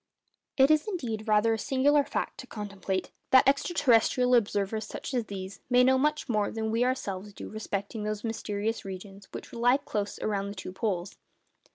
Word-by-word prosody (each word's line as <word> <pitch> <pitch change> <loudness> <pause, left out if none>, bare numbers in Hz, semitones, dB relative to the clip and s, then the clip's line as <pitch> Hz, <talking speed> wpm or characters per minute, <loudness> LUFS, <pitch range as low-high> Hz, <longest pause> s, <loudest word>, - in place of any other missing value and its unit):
It 270 +2 +6
is, 310 +3 +3
indeed, 235 - -3
rather 215 +1 +4
a 225 - -2
singular 280 +3 +3
fact - - -3
to 255 - -8
contemplate, 200 -4 -4 0.2
that 260 0 +6
ex 275 0 +4
terrestrial 250 -5 +3
observers, 215 -1 0
such - - -6
as 245 -3 0
these, 195 -1 -7
may 250 0 +5
know 260 +1 +4
much 300 +1 +1
more 210 -4 +1
than 220 -1 -3
we 230 +2 +2
ourselves 205 -6 -2
do - - -8
respecting 210 0 -4
those 210 0 -3
mysterious 225 -1 -2
regions 195 +1 -9
which - - -9
lie 245 +2 +4
close 205 -7 -3
around 200 -2 -1
the 200 - -7
two 190 - -6
poles. 190 -3 -2
220 Hz, 180 wpm, -28 LUFS, 200-255 Hz, 0.2 s, It